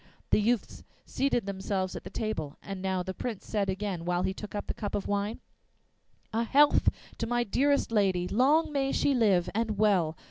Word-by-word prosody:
The - - +4
youths 230 +1 -1 0.2
seated 265 -5 0
themselves 190 -1 -2
at - - -6
the - - -8
table; 160 -10 -4
and 195 -2 -6
now 190 -1 -1
the 190 +1 -4
Prince 225 0 -5
said 205 -3 -1
again, 190 -3 -3
while 175 +1 0
he 190 0 0
took 210 +1 -8
up 205 - -3
the - - -3
cup 205 - -4
of 200 - -2
wine: 205 +2 -2 0.9
'A 230 +1 +1
health 290 +5 +5 0.3
to 230 - -1
my 240 +1 +1
dearest 280 +5 +1
lady, 190 -5 +2
Long 290 - +3
may 275 -2 0
she 285 - +2
live 200 -8 +3
and 220 -1 -1
well! 185 -7 +2
205 Hz, 190 wpm, -29 LUFS, 190-235 Hz, 0.9 s, health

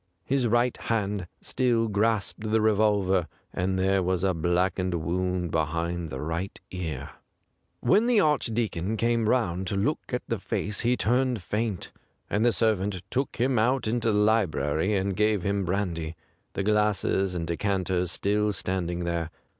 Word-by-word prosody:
His 135 -2 +1
right 120 +2 +2
hand 100 -5 -2
still 120 -3 +1
grasped 110 0 0
the 110 +1 +3
revolver, 105 -4 +2 0.3
and 95 +1 0
there 95 +1 +2
was 90 0 0
a 95 -1 +2
blackened 90 +2 0
wound 90 +1 -1
behind 80 +2 -1
the 65 - -5
right 80 +6 -3
ear. 80 -7 -4 0.7
When 215 +5 +4
the 240 -3 +4
Archdeacon 115 - 0
came 115 -1 +1
round 95 -7 +1
to 100 - -1
look 130 +11 +1
at 125 - -2
the 115 - -1
face 105 0 -2
he 125 +1 +2
turned 125 -2 +1
faint, 105 -1 -2 0.4
and 105 +2 +2
the 120 - +5
servant 105 -4 0
took 135 +2 -1
him 125 0 +1
out 125 +4 +2
into 115 0 +1
the 105 - +1
library 100 -4 +2
and 95 0 -1
gave 105 -2 +2
him 100 -1 0
brandy, 85 -4 -2 0.4
the 100 - -2
glasses 105 -2 +1
and 85 -1 -2
decanters 90 0 0
still 105 +2 +1
stand 95 -2 -2
ing 90 0 -3
there. 85 -1 -2
100 Hz, 155 wpm, -27 LUFS, 90-110 Hz, 0.7 s, the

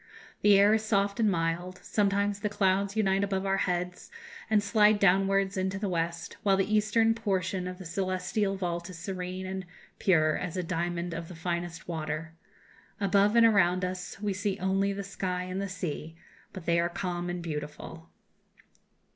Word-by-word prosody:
The 205 -1 +6
air 200 +2 +6
is 220 0 +2
soft 200 -1 +1
and 220 -2 +4
mild; 175 +1 -1
sometimes 200 0 +1
the 210 - -1
clouds 195 0 +1
unite 195 -2 +2
above 195 -1 -1
our 195 0 +1
heads 180 -1 -2 0.4
and 215 -2 +3
slide 210 0 +4
downwards 195 0 +3
into 190 +1 -1
the 205 +1 -2
west, 170 -1 -3
while 195 -2 +3
the 195 +2 0
eastern 225 +1 +3
portion 190 -4 -1
of 180 0 -6
the 185 - -10
celestial 185 +3 -1
vault 175 -2 -3
is 180 - -9
serene 185 0 -5
and 190 0 -4 0.4
pure 155 -5 +3
as 180 0 -4
a 180 - -1
diamond 175 0 -2
of 165 0 -5
the 180 - -10
finest 170 0 -4
water. 160 -1 -4 0.7
Above 200 +1 +3
and 230 -1 +7
around 185 -4 +4
us 180 +1 -5
we 205 -1 -1
see 200 0 -2
only 195 +1 +1
the 200 0 -4
sky 185 -2 -3
and 185 +1 -4
the 200 - -3
sea, 165 -3 -5 0.4
but 185 -3 -9
they 170 0 +3
are 170 0 +1
calm 175 0 -3
and 175 -1 -4
beautiful." 155 +1 -6
185 Hz, 175 wpm, -29 LUFS, 175-200 Hz, 0.7 s, and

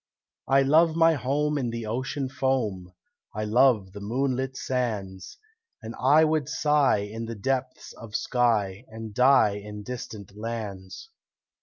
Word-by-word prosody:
I 135 0 +4
love 160 +4 +4
my 165 0 +5
home 145 +2 0
in 125 -3 -2
the 115 -1 -5
ocean 130 +5 -3
foam, 115 -9 -2 0.4
I 105 - -2
love 110 -3 +3
the 100 - -9
moonlit 130 +4 -2
sands, 105 -8 -3 0.5
And 110 - -6
I 145 +5 +5
would 155 -2 0
sigh 150 -8 +2
in 115 +2 -6
the 115 0 -6
depths 130 +3 -3
of 110 -2 -11
sky 110 -5 0
And 110 -1 -9
die 125 -4 +4
in 105 0 -8
distant 105 -4 -8
lands." 105 - -6
120 Hz, 140 wpm, -26 LUFS, 105-135 Hz, 0.5 s, my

